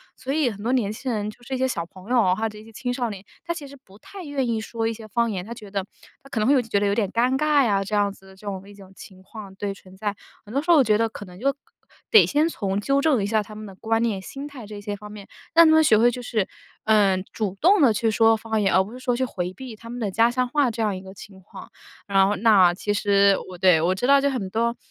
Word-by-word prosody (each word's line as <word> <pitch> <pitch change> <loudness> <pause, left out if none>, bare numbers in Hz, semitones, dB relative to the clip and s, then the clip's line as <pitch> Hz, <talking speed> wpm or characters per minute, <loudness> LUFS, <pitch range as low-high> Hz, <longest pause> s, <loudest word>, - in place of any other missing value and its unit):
所 265 - -6
以 290 -3 +2
很 205 -1 -8
多 240 - 0
年 235 -6 +1
轻 255 +3 -4
人 210 -2 -2
就 230 +3 -14
是 265 - -7
一 - - 0
些 260 +1 +1
小 170 -10 -3
朋 185 +5 -15
友 250 -2 +4
啊， 180 -2 +3
或 225 +2 -1
者 215 - -10
一 210 - -12
些 225 - -15
青 245 +3 -4
少 245 -2 -2
年， 200 -1 -9 0.2
他 340 - -1
其 305 -4 -8
实 280 - -12
不 195 +1 -18
太 390 - -11
愿 280 -4 -2
意 225 -2 -1
说 225 +1 -3
一 230 - -1
些 225 0 -11
方 235 +3 +1
言， 185 -4 -4
他 230 - -7
觉 215 -4 -12
得 195 -1 -3 0.4
他 275 - -16
可 235 - -3
能 215 - +1
会 280 - +5
有 265 - +4
一 - - -10
些 225 - -16
觉 200 - +2
得 205 - +1
有 200 - +1
点 205 -4 0
尴 250 +3 +1
尬 300 -2 +3
呀， 200 -3 +1
这 200 - -8
样 205 -1 +1
子 195 - -20
的 190 - -15
这 205 - -12
种 195 -1 -5
一 205 - -13
种 195 -1 -15
情 190 -1 -13
况， 200 0 -11
对， 200 0 -3
存 190 -1 -17
在。 205 0 -3 0.3
很 210 - -11
多 280 +2 0
时 345 - +2
候 330 - +7
我 280 - +6
觉 210 -1 +3
得 225 0 +1
可 205 - -9
能 180 -1 -13
就 275 +6 0 0.6
得 440 - +7
先 300 +3 +2
从 200 -10 -2
纠 275 +6 +1
正 280 -8 +2
一 - - -1
下 215 +1 +1
他 215 - -12
们 215 0 -8
的 195 -2 -11
观 225 +3 -1
念、 215 -5 -1
心 275 +8 -8
态 265 -6 -10
这 205 0 -9
些 205 0 -5
方 210 +1 -11
面， 205 -2 -11 0.3
让 335 +1 +8
他 315 - +5
们 315 - +6
学 220 -8 +5
会 240 +2 +5
就 245 +1 -5
是， 220 -5 -1 0.4
呃， 200 -4 +3
主 200 -3 -3
动 375 +3 +4
地 265 -5 +6
去 225 +1 0
说 225 +1 +4
方 220 -1 -2
言， 195 - +1
而 185 - +5
不 200 +4 -6
是 255 - -9
说 250 -1 -1
去 260 - 0
回 180 -7 -4
避 250 +3 -9
他 230 +2 -13
们 245 +1 -6
的 210 -3 -1
家 230 +5 +3
乡 250 0 0
话 275 -2 +1
这 225 - -5
样 210 -3 0
一 185 - -7
个 190 0 -11
情 195 0 -13
况。 - - -12 0.4
然 195 -1 +4
后 205 - 0
那 195 -5 +5
其 205 +3 -2
实 200 -1 +3
我 180 - -9
对， 175 -3 +4
我 175 +3 +2
知 190 +6 -2
道 280 0 +6
就 280 - +2
很 210 -8 -3
多 235 +3 0
220 Hz, 335 characters per minute, -23 LUFS, 200-250 Hz, 0.6 s, 让